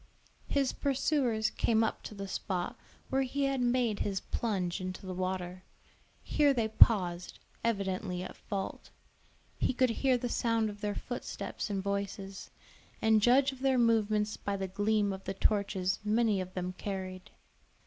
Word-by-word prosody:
His 275 Hz, -2 st, +1 dB
pursuers 265 Hz, -5 st, +1 dB
came 225 Hz, -1 st, +2 dB
up 220 Hz, -, -1 dB
to 215 Hz, -, -7 dB
the 200 Hz, 0 st, -5 dB
spot 185 Hz, -1 st, -3 dB, 0.4 s
where 270 Hz, -, +3 dB
he 275 Hz, +2 st, -1 dB
had 275 Hz, -1 st, +1 dB
made 240 Hz, -3 st, +2 dB
his 195 Hz, -2 st, -1 dB
plunge 190 Hz, -5 st, -2 dB
into 185 Hz, +1 st, -5 dB
the 185 Hz, -, -4 dB
water; 185 Hz, 0 st, -3 dB, 0.6 s
here 290 Hz, -2 st, +3 dB
they 225 Hz, -3 st, +1 dB
paused, 180 Hz, -6 st, +4 dB, 0.3 s
evidently 190 Hz, -4 st, -1 dB
at -, -, -7 dB
fault. 195 Hz, -3 st, -5 dB, 0.7 s
He 260 Hz, -, +1 dB
could 255 Hz, -1 st, +3 dB
hear 255 Hz, +2 st, +2 dB
the 245 Hz, -, -2 dB
sound 230 Hz, -2 st, +1 dB
of 205 Hz, 0 st, -13 dB
their 205 Hz, -1 st, -1 dB
footsteps 245 Hz, -2 st, -5 dB
and 195 Hz, -2 st, -2 dB
voices, 200 Hz, -1 st, -4 dB, 0.5 s
and 220 Hz, -1 st, +4 dB
judge 260 Hz, +5 st, +5 dB
of 265 Hz, -, -11 dB
their 265 Hz, -1 st, +2 dB
movements 215 Hz, -3 st, +2 dB
by 200 Hz, 0 st, -2 dB
the 190 Hz, 0 st, -2 dB
gleam 205 Hz, +1 st, +1 dB
of 190 Hz, 0 st, -8 dB
the 195 Hz, -, -3 dB
torches 195 Hz, -2 st, +1 dB
many 215 Hz, -2 st, +2 dB
of 185 Hz, 0 st, -8 dB
them 180 Hz, 0 st, -2 dB
carried. 185 Hz, -1 st, -5 dB
210 Hz, 160 wpm, -31 LUFS, 190-240 Hz, 0.7 s, judge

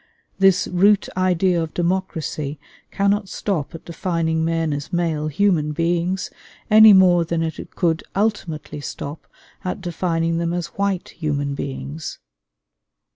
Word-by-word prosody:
This 195 Hz, -1 st, +4 dB
root 200 Hz, +3 st, +3 dB
idea 185 Hz, -1 st, +2 dB
of 160 Hz, -1 st, -5 dB
democracy 170 Hz, -5 st, -2 dB, 0.3 s
cannot 200 Hz, 0 st, 0 dB
stop 180 Hz, -7 st, -3 dB
at 165 Hz, -, -10 dB
defining 165 Hz, -1 st, -1 dB
men 165 Hz, -2 st, 0 dB
as 145 Hz, +1 st, -5 dB
male 165 Hz, -3 st, 0 dB
human 155 Hz, -2 st, +1 dB
beings, 175 Hz, +3 st, -1 dB, 0.4 s
any 215 Hz, 0 st, +9 dB
more 180 Hz, -3 st, +6 dB
than 165 Hz, 0 st, -1 dB
it 160 Hz, -1 st, -6 dB
could 170 Hz, -1 st, +1 dB
ultimately 175 Hz, -8 st, -2 dB
stop 145 Hz, +3 st, -7 dB, 0.4 s
at 180 Hz, -, -3 dB
defining 165 Hz, -2 st, -1 dB
them 170 Hz, 0 st, -1 dB
as 175 Hz, -1 st, -3 dB
white 200 Hz, -2 st, 0 dB
human 145 Hz, -3 st, -2 dB
beings. 140 Hz, +3 st, -5 dB
170 Hz, 130 wpm, -21 LUFS, 160-185 Hz, 0.4 s, any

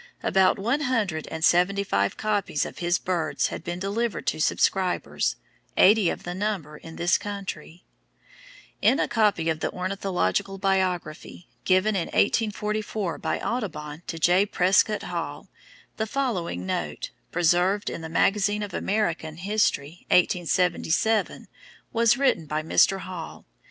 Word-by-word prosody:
About 190 Hz, -1 st, +3 dB
one 235 Hz, +9 st, 0 dB
hundred 215 Hz, -, -1 dB
and 160 Hz, 0 st, -1 dB
seventy 195 Hz, +3 st, +3 dB
five 100 Hz, -, 0 dB
copies 205 Hz, -8 st, 0 dB
of -, -, -8 dB
his 175 Hz, 0 st, +1 dB
"Birds" 175 Hz, -3 st, -1 dB
had -, -, -6 dB
been 175 Hz, 0 st, -4 dB
delivered 200 Hz, +3 st, -2 dB
to -, -, -1 dB
subscribers, 185 Hz, +3 st, +1 dB, 0.4 s
eighty 205 Hz, -3 st, +6 dB
of -, -, -4 dB
the 175 Hz, -, -4 dB
number 185 Hz, -6 st, -3 dB
in 165 Hz, +2 st, -11 dB
this 175 Hz, +1 st, +2 dB
country. 190 Hz, -5 st, -7 dB, 1.0 s
In 275 Hz, -, +4 dB
a -, -, +1 dB
copy 210 Hz, -8 st, +1 dB
of 160 Hz, -1 st, 0 dB
the -, -, -1 dB
"Ornithological 190 Hz, -, -1 dB
Biography" 185 Hz, -3 st, -2 dB, 0.2 s
given 190 Hz, +3 st, +3 dB
in 175 Hz, -4 st, -1 dB
1844 210 Hz, -4 st, -1 dB
by -, -, -2 dB
Audubon 165 Hz, -10 st, -4 dB
to 165 Hz, -, -4 dB
J. 175 Hz, +4 st, +4 dB
Prescott 195 Hz, +3 st, +2 dB
Hall, -, -, -5 dB, 0.5 s
the 220 Hz, -, -1 dB
following 190 Hz, -, -2 dB
note, 75 Hz, -5 st, -3 dB, 0.2 s
preserved 175 Hz, +4 st, +2 dB
in -, -, -3 dB
the 160 Hz, -, -6 dB
Magazine 205 Hz, +4 st, +2 dB
of 205 Hz, -, -6 dB
American 170 Hz, -7 st, -1 dB
History 180 Hz, -4 st, -1 dB
(1877) 180 Hz, +4 st, +1 dB, 0.5 s
was 230 Hz, +1 st, +4 dB
written 265 Hz, -, +1 dB
by 155 Hz, +1 st, -2 dB
Mr. 190 Hz, +4 st, +3 dB
Hall. 180 Hz, -3 st, -8 dB
185 Hz, 135 wpm, -25 LUFS, 165-210 Hz, 1.0 s, eighty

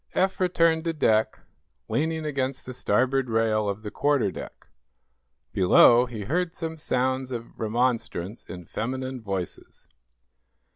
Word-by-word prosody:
Eph 190 Hz, 0 st, +1 dB
returned 165 Hz, -3 st, +2 dB
to 165 Hz, -, 0 dB
deck, 110 Hz, -8 st, +1 dB, 0.5 s
leaning 160 Hz, +1 st, -1 dB
against 135 Hz, -3 st, -2 dB
the 130 Hz, -, -7 dB
starboard 130 Hz, +1 st, +1 dB
rail 110 Hz, -2 st, +1 dB
of 100 Hz, +2 st, -4 dB
the 105 Hz, -, -5 dB
quarter 140 Hz, -9 st, +1 dB
deck. -, -, -9 dB, 0.9 s
Below, 120 Hz, +6 st, +6 dB
he 115 Hz, -4 st, -6 dB
heard 170 Hz, -, -1 dB
some 160 Hz, -1 st, -4 dB
sounds 130 Hz, -3 st, -1 dB
of 120 Hz, -2 st, -7 dB
remonstrance 115 Hz, -3 st, -1 dB
in 90 Hz, -1 st, -9 dB
feminine 130 Hz, +4 st, -4 dB
voices. 95 Hz, -5 st, -6 dB
125 Hz, 130 wpm, -26 LUFS, 110-150 Hz, 0.9 s, Below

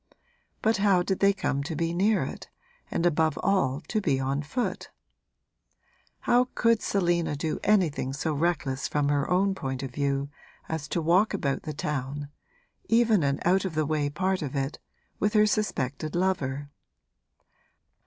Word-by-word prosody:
But 220 Hz, 0 st, +3 dB
how 195 Hz, -3 st, +3 dB
did 190 Hz, +1 st, -1 dB
they 200 Hz, 0 st, +5 dB
come 145 Hz, -8 st, -1 dB
to 160 Hz, +3 st, -4 dB
be 165 Hz, +1 st, -1 dB
near 195 Hz, +1 st, +2 dB
it -, -, -7 dB, 0.4 s
and 170 Hz, -, -1 dB
above 160 Hz, -2 st, +2 dB
all 180 Hz, -9 st, +1 dB
to 215 Hz, -, -2 dB
be 135 Hz, -9 st, +1 dB
on 135 Hz, +2 st, -1 dB
foot? 235 Hz, -, -3 dB, 1.3 s
How 245 Hz, +1 st, +3 dB
could 230 Hz, -2 st, +3 dB
Selina 175 Hz, -5 st, +1 dB
do 155 Hz, +2 st, -2 dB
anything 180 Hz, -10 st, +2 dB
so 145 Hz, +3 st, -2 dB
reckless 145 Hz, -4 st, -1 dB
from 145 Hz, -1 st, 0 dB
her 145 Hz, -1 st, +1 dB
own 195 Hz, +2 st, +2 dB
point 135 Hz, -7 st, -4 dB
of 135 Hz, -, -5 dB
view 140 Hz, +1 st, -1 dB, 0.4 s
as 160 Hz, -3 st, -4 dB
to 165 Hz, +2 st, -2 dB
walk 185 Hz, +6 st, +3 dB
about 140 Hz, -8 st, -1 dB
the 155 Hz, -, -5 dB
town 145 Hz, 0 st, -3 dB, 0.6 s
even 225 Hz, -4 st, +4 dB
an 140 Hz, -1 st, 0 dB
out 185 Hz, +2 st, +3 dB
of 185 Hz, -4 st, -4 dB
the 155 Hz, 0 st, +1 dB
way 150 Hz, -1 st, 0 dB
part 185 Hz, +5 st, -1 dB
of 145 Hz, -2 st, -4 dB
it 135 Hz, +1 st, -2 dB, 0.4 s
with 210 Hz, +1 st, +1 dB
her 210 Hz, -1 st, +5 dB
suspected 155 Hz, -9 st, -1 dB
lover? 145 Hz, -6 st, -1 dB
160 Hz, 160 wpm, -27 LUFS, 140-190 Hz, 1.3 s, they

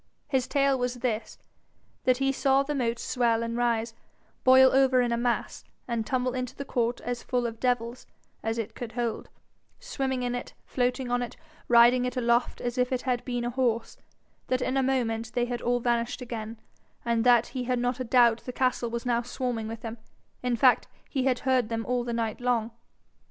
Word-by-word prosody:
His 265 Hz, -4 st, 0 dB
tale 275 Hz, -2 st, +2 dB
was 250 Hz, 0 st, -1 dB
this 235 Hz, -3 st, -3 dB, 0.7 s
that 255 Hz, -1 st, +4 dB
he 270 Hz, +1 st, +1 dB
saw 270 Hz, 0 st, +2 dB
the 295 Hz, +2 st, -3 dB
moat 240 Hz, -4 st, 0 dB
swell 235 Hz, -2 st, +1 dB
and 230 Hz, 0 st, -3 dB
rise, 235 Hz, -1 st, 0 dB, 0.5 s
boil 260 Hz, 0 st, +7 dB
over 265 Hz, -1 st, +4 dB
in 245 Hz, -1 st, +1 dB
a -, -, +2 dB
mass, 240 Hz, 0 st, -1 dB, 0.2 s
and 230 Hz, -3 st, -2 dB
tumble 255 Hz, -1 st, 0 dB
into 255 Hz, -1 st, -4 dB
the 280 Hz, -, -6 dB
court 240 Hz, -2 st, -1 dB
as 245 Hz, 0 st, -4 dB
full 245 Hz, -1 st, -1 dB
of 230 Hz, -1 st, -4 dB
devils 245 Hz, -1 st, -1 dB, 0.3 s
as 225 Hz, +1 st, -2 dB
it 225 Hz, -2 st, -4 dB
could 235 Hz, -2 st, -7 dB
hold, 235 Hz, -2 st, -3 dB, 0.5 s
swimming 270 Hz, -, -2 dB
in 245 Hz, 0 st, -1 dB
it, 245 Hz, -, -6 dB
floating 250 Hz, 0 st, -1 dB
on 245 Hz, 0 st, +1 dB
it, 245 Hz, -, -5 dB, 0.3 s
riding 240 Hz, +1 st, +6 dB
it 250 Hz, +1 st, -3 dB
aloft 235 Hz, 0 st, +1 dB
as 245 Hz, +1 st, -3 dB
if 250 Hz, +1 st, +1 dB
it 255 Hz, -1 st, -1 dB
had 250 Hz, -2 st, -1 dB
been 245 Hz, -1 st, -2 dB
a 240 Hz, -, -1 dB
horse; 235 Hz, -3 st, 0 dB, 0.5 s
that 255 Hz, -, +1 dB
in 255 Hz, -, -1 dB
a 270 Hz, -, +3 dB
moment 230 Hz, -4 st, -1 dB
they 240 Hz, -1 st, +1 dB
had 245 Hz, -1 st, -4 dB
all 245 Hz, 0 st, +1 dB
vanished 235 Hz, +1 st, 0 dB
again, 230 Hz, -3 st, -6 dB, 0.5 s
and 230 Hz, -1 st, +1 dB
that 240 Hz, -1 st, +5 dB
he 255 Hz, -2 st, -4 dB
had 250 Hz, 0 st, 0 dB
not 245 Hz, +1 st, -1 dB
a -, -, -1 dB
doubt 235 Hz, -1 st, +4 dB
the 250 Hz, -, -4 dB
castle 250 Hz, -2 st, 0 dB
was 235 Hz, +1 st, -4 dB
now 240 Hz, -1 st, +1 dB
swarming 245 Hz, -2 st, -3 dB
with 225 Hz, 0 st, -7 dB
them 230 Hz, 0 st, -6 dB, 0.4 s
in 250 Hz, -1 st, 0 dB
fact, 250 Hz, +2 st, +4 dB, 0.2 s
he 265 Hz, -2 st, 0 dB
had 255 Hz, -2 st, +2 dB
heard 255 Hz, -4 st, +2 dB
them 225 Hz, -1 st, -2 dB
all 250 Hz, -1 st, 0 dB
the 240 Hz, -, -4 dB
night 230 Hz, -1 st, -2 dB
long. 240 Hz, -2 st, 0 dB
245 Hz, 205 wpm, -27 LUFS, 235-255 Hz, 0.7 s, boil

